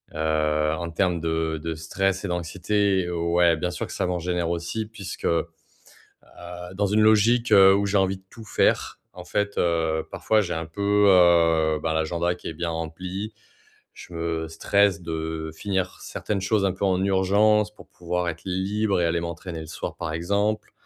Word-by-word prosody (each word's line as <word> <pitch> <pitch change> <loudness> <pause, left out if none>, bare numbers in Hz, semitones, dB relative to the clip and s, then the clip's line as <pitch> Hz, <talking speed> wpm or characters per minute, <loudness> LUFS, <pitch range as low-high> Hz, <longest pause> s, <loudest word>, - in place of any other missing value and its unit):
heu, 75 -1 +1
en 85 0 -4
termes 90 0 0
de 80 -1 -1
de 80 -1 -3
stress 95 +4 -1
et - - -3
d'anxiété, 95 +2 0
ouais, 85 0 +2
bien 90 +2 -2
sûr, - - -4
que - - -8
ça - - -1
m'en 90 -1 -1
génère 85 -1 -1
aussi 85 +6 -3
puisque, 100 -4 -8
heu, 85 0 +2 1.3
dans 100 +1 +1
une 105 +2 +2
logique, 110 +3 +4
heu, 95 -1 +8
où 100 +1 +1
j'ai 100 0 +1
envie 95 0 +1
de 95 - -24
tout 115 - -11
faire, 100 - +1
en 90 -1 -10
fait, 100 +2 -2
heu, 80 -2 0
parfois, 110 -1 +2
j'ai 90 -4 -3
un 80 0 -3
peu, 100 +4 +1
heu, 85 -4 +4
bah, 80 -1 0
l'agenda 85 +2 0
qui - - -10
est - - -6
bien 85 +2 -3
rempli. 90 +6 -5 0.6
Je - - -13
me 85 -1 -2
stresse 100 +1 +2
de 80 -1 -4
finir 95 0 -2
certaines 100 -2 -4
choses 100 +1 +1
un 95 - +2
peu 95 - -6
en 95 -1 +1
urgence, 100 +2 +3
pour - - -16
pouvoir 90 0 -3
être 80 0 -6
libre 95 +2 0
et - - +2
aller 85 0 +1
m'entraîner 85 0 -6
le 80 - -9
soir, 85 - -6
par 80 -1 -4
exemple, 100 +6 -1
90 Hz, 185 wpm, -24 LUFS, 80-100 Hz, 1.3 s, heu